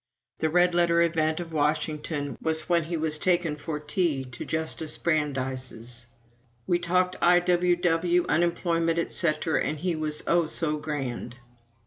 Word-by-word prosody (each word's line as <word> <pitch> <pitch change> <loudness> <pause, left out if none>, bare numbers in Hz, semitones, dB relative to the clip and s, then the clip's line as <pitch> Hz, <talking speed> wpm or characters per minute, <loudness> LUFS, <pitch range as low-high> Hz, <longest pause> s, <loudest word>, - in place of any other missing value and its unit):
The 160 - +1
red 175 +2 +3
letter 170 -1 +3
event 160 -1 +1
of 165 -2 -7
Washington 150 -1 -1
was 160 -1 0
when 170 -2 +2
he 170 +1 -3
was 155 -1 -1
taken 175 -3 +1
for 150 +1 -5
tea 150 -2 0
to 125 -3 -8
Justice 160 0 -2
Brandeis's. 130 -6 -2 0.6
"We 175 -1 +1
talked 180 +1 +1
I.W.W., 175 0 +3
unemployment, 170 0 +1
etc., 160 -1 +1
and 155 - -2
he 175 +2 -1
was 155 -1 -3
oh, 170 -1 +2
so 155 -1 0
grand!" 135 -5 -4
160 Hz, 135 wpm, -26 LUFS, 150-175 Hz, 0.6 s, red